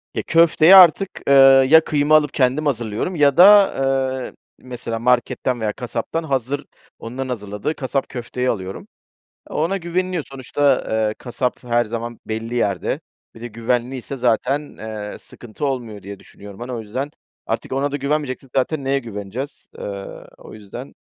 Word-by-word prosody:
E, -, -, -2 dB
köfteyi 165 Hz, +1 st, +6 dB
artık, 185 Hz, +1 st, +7 dB, 0.2 s
eee, 140 Hz, -, +5 dB, 0.4 s
ya 160 Hz, +1 st, +7 dB
kıyma 150 Hz, 0 st, +2 dB
alıp 150 Hz, -2 st, +3 dB
kendim 135 Hz, +3 st, +1 dB
hazırlıyorum 120 Hz, -, -2 dB
ya 145 Hz, -3 st, +3 dB
da, 200 Hz, +2 st, +8 dB, 0.5 s
eee, -, -, -13 dB, 0.3 s
mesela 120 Hz, -2 st, -6 dB
marketten 125 Hz, +1 st, 0 dB
veya 105 Hz, -1 st, -1 dB
kasaptan 135 Hz, +6 st, -4 dB
hazır, 135 Hz, -1 st, -2 dB, 0.3 s
onların 130 Hz, +3 st, -6 dB
hazırladığı 105 Hz, +4 st, -4 dB
kasap 135 Hz, 0 st, -2 dB
köfteyi 125 Hz, 0 st, -3 dB
alıyorum. 95 Hz, -4 st, -4 dB, 0.6 s
Ona 165 Hz, +6 st, -1 dB
güveniliyor, 180 Hz, -2 st, -2 dB
sonuçta, 135 Hz, +1 st, 0 dB, 0.2 s
eee, 105 Hz, -, -3 dB
kasap 125 Hz, 0 st, -3 dB
her 120 Hz, 0 st, +1 dB
zaman 115 Hz, +1 st, -6 dB
belli 110 Hz, +2 st, -4 dB
yerde. 100 Hz, -7 st, -1 dB, 0.3 s
Bir 115 Hz, -, -14 dB
de 120 Hz, -, -6 dB
güvenliyse 120 Hz, +3 st, -3 dB
zaten, 125 Hz, +4 st, 0 dB
eee, 105 Hz, -2 st, -7 dB
sıkıntı 120 Hz, +5 st, -7 dB
olmuyor 120 Hz, -6 st, -4 dB
diye 100 Hz, +1 st, -9 dB
düşünüyorum, 100 Hz, +1 st, -13 dB
hani, 120 Hz, +1 st, -6 dB
o 120 Hz, -, -4 dB
yüzden. 130 Hz, +7 st, -5 dB, 0.4 s
Artık -, -, -3 dB
ona 140 Hz, +2 st, 0 dB
da 145 Hz, -, -2 dB
güvenmeyeceksek 140 Hz, -2 st, -3 dB
zaten 140 Hz, +2 st, 0 dB
neye 135 Hz, +1 st, +1 dB
güveneceğiz? 115 Hz, +3 st, -7 dB
Eee, -, -, -7 dB, 0.5 s
o -, -, -13 dB
yüzden, 105 Hz, -2 st, -10 dB
130 Hz, 150 wpm, -20 LUFS, 115-145 Hz, 0.6 s, da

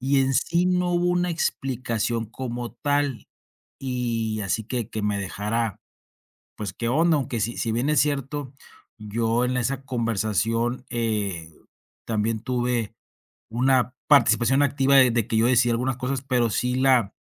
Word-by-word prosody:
y 135 Hz, +2 st, +2 dB
en 135 Hz, 0 st, +1 dB
si 175 Hz, +6 st, +2 dB
no 180 Hz, -1 st, +1 dB
hubo 175 Hz, 0 st, +1 dB
una 180 Hz, 0 st, +1 dB
explicación 120 Hz, -7 st, -2 dB
como 120 Hz, +1 st, -5 dB
tal 145 Hz, +1 st, -1 dB, 0.5 s
y 115 Hz, -4 st, -2 dB
así 105 Hz, +3 st, -1 dB
que 120 Hz, -2 st, -3 dB
que 110 Hz, -, -3 dB
me 105 Hz, 0 st, 0 dB
dejara, 105 Hz, +3 st, -2 dB, 0.8 s
pues, 105 Hz, -3 st, -5 dB
qué 115 Hz, -, -3 dB
onda, 160 Hz, +6 st, +3 dB
aunque 130 Hz, -5 st, -2 dB
si 115 Hz, +2 st, -2 dB
si 115 Hz, -, -1 dB
bien 120 Hz, +5 st, 0 dB
es 150 Hz, -, +3 dB
cierto, 140 Hz, -1 st, -2 dB, 0.4 s
yo 115 Hz, +3 st, 0 dB
en 125 Hz, +1 st, -1 dB
esa 130 Hz, +2 st, -2 dB
conversación, 115 Hz, 0 st, -1 dB
eh, 105 Hz, -8 st, -2 dB, 0.6 s
también 110 Hz, 0 st, -1 dB
tuve 120 Hz, -2 st, -1 dB, 0.6 s
una 125 Hz, +2 st, +2 dB
participación 125 Hz, -1 st, +4 dB
activa 140 Hz, -1 st, +2 dB
de 130 Hz, -2 st, +7 dB
de 115 Hz, -2 st, 0 dB
que 115 Hz, -, 0 dB
yo 110 Hz, +1 st, +4 dB
decía 120 Hz, -1 st, +3 dB
algunas 125 Hz, +2 st, -1 dB
cosas, 130 Hz, 0 st, -2 dB
pero 125 Hz, -4 st, +1 dB
sí 125 Hz, +4 st, 0 dB
la 130 Hz, -5 st, +3 dB
120 Hz, 155 wpm, -24 LUFS, 115-135 Hz, 0.8 s, de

